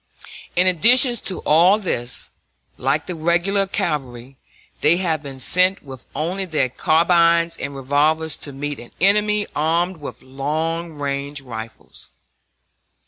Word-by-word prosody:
In 180 - +3
addition 240 - +5
to 200 -5 -3
all 175 +6 +5
this, 125 - -3 0.4
like 135 +4 -1
the 180 - -5
regular 175 +5 +1
cavalry, 135 - -4 0.4
they 165 +3 +4
have 165 -5 -1
been 135 -3 -9
sent 185 +8 +2
with 130 -3 -11
only 180 +5 -2
their 155 -7 0
carbines 170 +3 +3
and 140 -3 -6
revolvers 150 +3 +1
to 145 - -8
meet 145 +1 -5
an 120 - -12
enemy 210 +3 +3
armed 170 +4 0
with 145 - -9
long 160 +5 -3
range 140 0 -4
rifles. 115 -3 -9
160 Hz, 130 wpm, -20 LUFS, 140-180 Hz, 0.4 s, addition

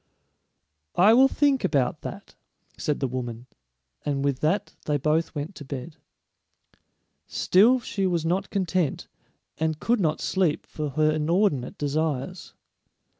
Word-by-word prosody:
"I 205 +5 +6
will 260 +3 +7
think 280 -1 +2
about 140 -4 +1
that," - - -8 0.4
said 150 -2 -2
the 135 - +1
woman, 120 -2 -5 0.6
and 140 -1 -1
with 140 -2 0
that 185 +7 0
they 150 -1 +1
both 155 +4 0
went 150 +6 -4
to 145 - -8
bed. 140 +3 -7 1.3
Still 230 +8 +4
she 195 -5 -2
was 170 -3 0
not 185 +4 0
content, 185 -6 -1 0.5
and 160 -1 0
could 235 +6 +1
not 155 -5 +1
sleep 175 -5 0
for 150 -1 -4
her 155 +3 +2
inordinate 155 -3 +1
desires. 150 +3 -2
155 Hz, 130 wpm, -25 LUFS, 145-190 Hz, 1.3 s, will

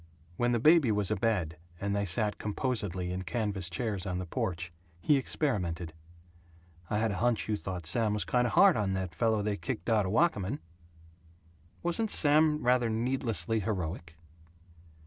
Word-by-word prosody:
When 120 +6 +1
the 120 - +2
baby 150 -2 +5
was 105 -1 0
abed, 95 -7 -1 0.2
and 100 0 -1
they 100 0 0
sat 105 +3 0
composedly 105 -5 -2
in 90 +1 -3
canvas 100 -3 -2
chairs 100 0 -3
on 90 -1 -2
the 90 - -4
porch, 85 0 -3 0.3
he 145 - +3
experimented; 90 - -2 1.0
"I 105 - 0
had 110 0 +1
a 100 - -3
hunch 120 +3 +1
you 110 - 0
thought 95 -4 -6
Sam 105 +6 +2
was 105 -4 -1
kind 125 +4 +2
of - - -4
hard 200 -3 +6
on 100 -3 0
that 95 -2 -3
fellow 110 -3 +1
they 105 -1 -1
kicked 85 +4 -4
out 105 -4 +2
of - - -2
Wakamin." 115 - +1 1.3
"Wasn't 175 +6 0
Sam 150 -2 +4
rather 125 -1 +3
needlessly 115 -1 0
heroic?" 90 -5 -4
105 Hz, 165 wpm, -30 LUFS, 90-120 Hz, 1.3 s, hard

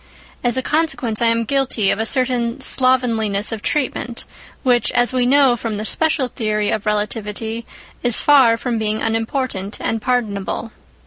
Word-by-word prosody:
As 245 0 +1
a 260 - -1
consequence, 300 -8 0
I 235 - +3
am 230 0 +2
guilty 250 -5 +1
of - - -1
a 220 - +1
certain 250 -1 0
slovenliness 230 -7 +1
of 220 -2 -5
treatment, 245 -4 -2 0.4
which, 245 -3 +3
as 245 +1 +2
we 250 -1 +1
know 270 -2 +5
from 225 -3 -4
the 215 - -4
special 305 0 0
theory 215 -3 -1
of 215 0 -2
relativity, 210 +2 -2 0.3
is 245 -2 +2
far 260 -6 +5
from 240 -1 -2
being 215 0 -1
unimportant 225 -3 -2
and 225 -1 -2
pardonable. 220 -3 -2
235 Hz, 155 wpm, -19 LUFS, 220-255 Hz, 0.4 s, know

